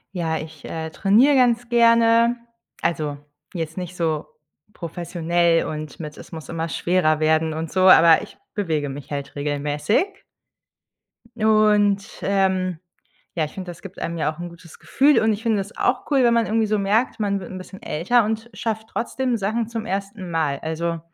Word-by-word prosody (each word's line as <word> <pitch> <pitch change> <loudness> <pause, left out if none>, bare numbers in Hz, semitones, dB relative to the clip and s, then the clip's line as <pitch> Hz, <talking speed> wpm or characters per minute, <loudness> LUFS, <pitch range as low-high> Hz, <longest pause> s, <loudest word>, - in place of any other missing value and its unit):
Ja, 160 -2 -1
ich, 155 -2 -9
äh, 160 0 -5
trainiere 215 - +4
ganz 245 -2 +2
gerne, 230 0 +5 0.5
also, 150 -4 -1 0.4
jetzt 160 -1 -5
nicht 180 -1 -5
so 160 -3 -1 0.5
professionell 170 -1 0
und 155 +1 -6
mit, 150 -1 -8
„es - - -13
muss 160 -2 -8
immer 165 0 -3
schwerer 165 -2 +1
werden 160 0 +2
und 160 0 -4
so“, 185 0 +3
aber 165 -2 +7
ich - - -12 0.2
bewege 160 -9 -1
mich 140 +1 -8
halt 140 -1 -5
regelmäßig. 150 - -1 1.1
Und, 210 -2 +3
ähm, 190 -3 0 0.6
ja, 160 - +1
ich 150 - -8
finde, 185 -2 -7
das 170 - -12
gibt 195 -1 -11
einem 170 0 -3
ja 155 0 0
auch 155 - -18
’n 175 0 -5
gutes 170 -1 -15
Gefühl 285 +2 +3
und 220 0 +2
ich 210 +1 -4
finde 225 -3 +1
das 195 +2 -6
auch 250 0 0
cool, 275 -3 +4
wenn 235 -1 +4
man 230 -1 +2
irgendwie 225 0 +1
so 215 0 0
merkt, 210 +5 +1
man 200 -2 0
wird 185 - -9
’n 185 - -6
bisschen 190 +1 -11
älter 200 +10 +2
und 220 +2 -3
schafft 220 -1 -3
trotzdem 250 0 -2
Sachen 220 +3 -1
zum 230 -1 -5
ersten 195 -1 -4
Mal. 155 -4 -1
Also, 165 +1 -3
185 Hz, 180 wpm, -22 LUFS, 160-220 Hz, 1.1 s, aber